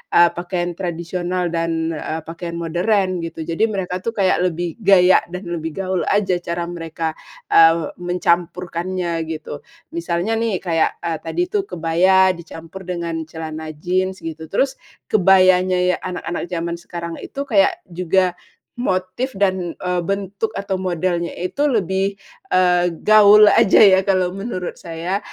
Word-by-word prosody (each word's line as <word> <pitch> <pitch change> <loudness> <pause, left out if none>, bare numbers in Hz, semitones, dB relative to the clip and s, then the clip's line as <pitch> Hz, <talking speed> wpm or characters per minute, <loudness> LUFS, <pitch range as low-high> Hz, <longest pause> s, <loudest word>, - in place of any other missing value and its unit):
eee, 170 0 +7
pakaian 175 0 -3
tradisional 175 0 -2
dan, 165 -1 -1
eee, 160 0 -4
pakaian 170 +1 -7
modern, 180 +3 0
gitu. 165 -1 -5
Jadi, 165 +8 0
mereka 190 -4 -3
tuh 230 +5 -4
kayak 185 -2 +2
lebih 175 +3 -4
gaya 185 -3 +6
dan 180 +2 -7
lebih 160 -3 -5
gaul 185 -3 -2
aja 190 -3 +1
cara 170 0 -3
mereka, 165 -1 -4 0.4
eee, 165 -1 +5
mencampurkannya, 175 -1 -1
gitu. 155 -2 -6 0.3
Misalnya 170 +5 -1
nih 225 -4 0
kayak, 165 -1 +1
eee, 165 -1 -1
tadi 165 - -2
tuh 395 0 -1
kebaya 185 +3 +3
dicampur 165 +1 -10
dengan 170 -2 -3 0.2
celana 160 -1 -6
jeans 185 +3 -1
gitu, 160 0 -6
terus 265 +6 +1 0.4
kebayanya 185 -2 +4
ya 180 0 +2
anak-anak 180 -2 -4
zaman 170 -1 -3
sekarang 170 -1 -6
itu 280 - -6
kayak 205 -8 +3
juga 180 +1 +1 0.5
motif 185 +4 -2
dan, 190 -3 0
eee, 180 -1 -2
bentuk 200 +2 -2
atau 195 -1 -2
modelnya 175 -1 -1
itu 185 +12 -2
lebih, 195 - 0 0.4
eee, 180 -1 +4 0.2
gaul 210 0 +7
aja 225 -2 +4
ya, 195 -3 +7
kalau 185 -2 +2
menurut 195 -2 -5
saya, 170 +3 -3
180 Hz, 140 wpm, -20 LUFS, 170-190 Hz, 0.5 s, eee